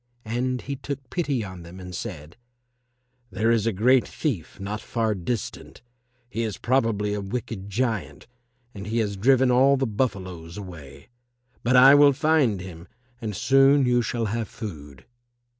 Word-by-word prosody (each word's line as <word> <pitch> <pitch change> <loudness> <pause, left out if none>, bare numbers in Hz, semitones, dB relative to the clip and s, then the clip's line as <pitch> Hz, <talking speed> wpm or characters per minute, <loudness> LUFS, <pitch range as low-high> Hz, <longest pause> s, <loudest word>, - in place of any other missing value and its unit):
And 125 +3 -2
he 140 - -4
took 135 -1 -7
pity 145 -9 -1
on 95 -3 -8
them 85 +2 -11
and 90 -1 -9
said, 85 -6 -7 0.9
"There 110 +2 +1
is 115 -1 +2
a - - +3
great 120 +6 +3
thief 110 - -4
not 105 +2 -4
far 115 -2 -1
distant. 105 +5 -5 0.4
He 115 -1 -4
is 110 -4 -3
probably 115 -5 0
a 105 - -2
wicked 100 -1 -5
giant, 110 -1 -2 0.5
and 100 0 -8
he 110 +2 -2
has 105 -3 0
driven 130 +5 +3
all 135 +3 +5
the 135 - 0
buffaloes 95 -8 -3
away. 75 - -10 0.5
But 120 +2 +2
I 130 +2 +9
will 145 0 +7
find 135 - +2
him 90 -2 -10 0.3
and 105 -3 -4
soon 135 +4 +4
you 120 0 +3
shall 115 0 -2
have 110 +1 -2
food." 75 - -9
110 Hz, 160 wpm, -25 LUFS, 95-130 Hz, 0.9 s, I